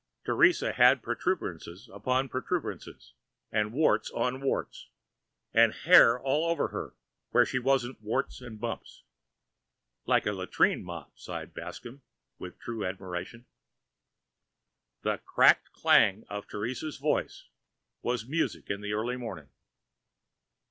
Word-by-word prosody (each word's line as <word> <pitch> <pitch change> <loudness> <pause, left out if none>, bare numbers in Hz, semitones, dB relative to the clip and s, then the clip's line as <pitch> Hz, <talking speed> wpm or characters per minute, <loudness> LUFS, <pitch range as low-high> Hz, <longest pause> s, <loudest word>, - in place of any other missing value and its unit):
Teresa - - +3
had - - +5
protuberances 90 +8 -3
upon 130 +6 0
protuberances 145 +7 -5 0.4
and 105 0 0
warts 115 -6 +2
on 125 +3 -2
warts, 135 - -3 0.6
and - - +6
hair 115 +2 +6
all 145 +6 0
over 170 - 0
her - - -6 0.3
where - - +4
she 130 - -1
wasn't 130 -2 0
warts 115 +5 -2
and 115 -4 -10
bumps. 115 +1 -6 1.0
"Like - - +3
a 105 - 0
latrine 95 -1 +1
mop!" 85 -5 -9
sighed - - -7
Bascomb 130 +4 -9 0.4
with - - -9
true 115 -3 -5
admiration. 95 +5 -6 1.6
The - - 0
cracked - - +4
clang 100 +3 +3
of 105 0 -6
Teresa's 125 +8 -4
voice 150 +2 -1 0.6
was 120 -2 -2
music 160 -5 -2
in 100 +1 -3
the 105 0 -3
early 120 +4 -1
morning. 110 - -7
120 Hz, 120 wpm, -29 LUFS, 105-130 Hz, 1.6 s, and